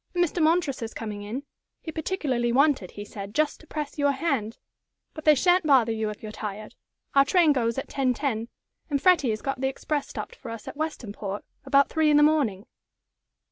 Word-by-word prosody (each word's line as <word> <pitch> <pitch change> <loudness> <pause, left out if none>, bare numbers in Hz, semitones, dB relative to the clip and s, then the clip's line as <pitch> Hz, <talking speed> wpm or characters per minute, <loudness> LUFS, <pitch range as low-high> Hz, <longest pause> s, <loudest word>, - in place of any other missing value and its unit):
And 350 0 +4
Mr. 345 +1 -3
Montresor's 310 -8 +1
coming 210 -2 -5
in. 225 +7 -5 0.4
He 320 - -7
particularly 290 -8 -1
wanted, 270 - +3
he 205 - -8
said, 200 0 -8
just 305 -1 +1
to 320 - -18
press 300 -1 -5
your 285 0 +3
hand. 265 -7 -1 0.6
But 310 - -9
they 305 -1 +7
sha'n't 355 +3 +3
bother 255 -5 +5
you 220 -1 -1
if 210 - -8
you're 215 - -6
tired. 210 0 -6 0.4
Our 275 - +7
train 330 0 +4
goes 235 -3 0
at 270 - -3
10.10, 255 -3 -1 0.4
and 285 -2 +1
Freddie 310 -4 +4
has 215 -1 -2
got 270 -1 -3
the 265 - +2
express 285 +2 -2
stopped 480 - -7
for - - -10
us 230 -2 -8
at - - -6
Westonport 215 -10 -4 0.2
about 280 0 +4
three 315 -1 +2
in 295 - +5
the 295 - +6
morning." 270 -10 +2
275 Hz, 195 wpm, -26 LUFS, 225-305 Hz, 0.6 s, they